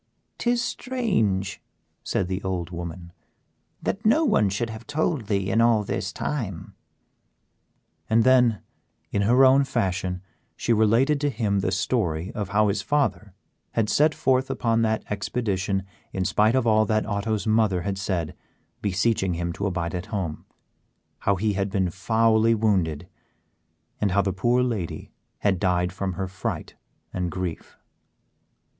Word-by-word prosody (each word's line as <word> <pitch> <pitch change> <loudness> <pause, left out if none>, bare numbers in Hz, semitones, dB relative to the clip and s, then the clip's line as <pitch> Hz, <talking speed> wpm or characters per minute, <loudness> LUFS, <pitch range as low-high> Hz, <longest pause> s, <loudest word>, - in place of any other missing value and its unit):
"Tis 240 0 +1
strange," 185 - -1 0.4
said 90 - -1
the 95 +1 -3
old 90 -3 -3
woman, 85 0 -7 0.7
"that 205 - -2
no 295 +9 +4
one 110 - +3
should 110 +4 -2
have 110 0 -10
told 150 -6 -1
thee 100 -2 0
in 115 - +3
all 115 -2 +4
this - - -3
time." 105 - -4 1.4
And 115 +1 +4
then, 125 -4 +4 0.5
in 100 - +1
her 125 +6 +5
own 135 +2 +6
fashion 90 -6 -2 0.3
she 120 - 0
related 115 +7 +3
to 145 - +2
him 105 -6 0
the 95 - 0
story 90 -2 -1
of 105 -5 -4
how 105 0 +3
his 100 0 0
father 105 -6 -1 0.4
had 110 -2 +1
set 150 +1 +3
forth 130 0 +1
upon 115 -2 +1
that 110 -1 +1
expedition 100 -2 -1 0.3
in 95 -1 -1
spite 110 +6 +3
of 130 -2 +2
all 110 -1 +4
that 110 0 +1
Otto's 105 +1 -2
mother 110 -5 +2
had 100 -1 -3
said, 90 -5 -2 0.5
beseeching 100 -2 +1
him 85 0 -2
to 100 +4 -2
abide 85 -3 -2
at 90 0 -4
home; 90 -7 -4 0.7
how 100 - +1
he 105 +2 0
had 100 0 -1
been 95 -3 0
foully 115 +4 +3
wounded, 95 -9 0 0.9
and 105 - +1
how 100 +2 +2
the 95 0 -1
poor 120 +6 +2
lady 110 -9 -3 0.3
had 95 -3 +2
died 90 -1 +1
from 95 0 -3
her 95 +2 -3
fright 90 0 -5 0.4
and 90 -1 -2
grief. 90 -1 -5
100 Hz, 150 wpm, -25 LUFS, 95-115 Hz, 1.4 s, own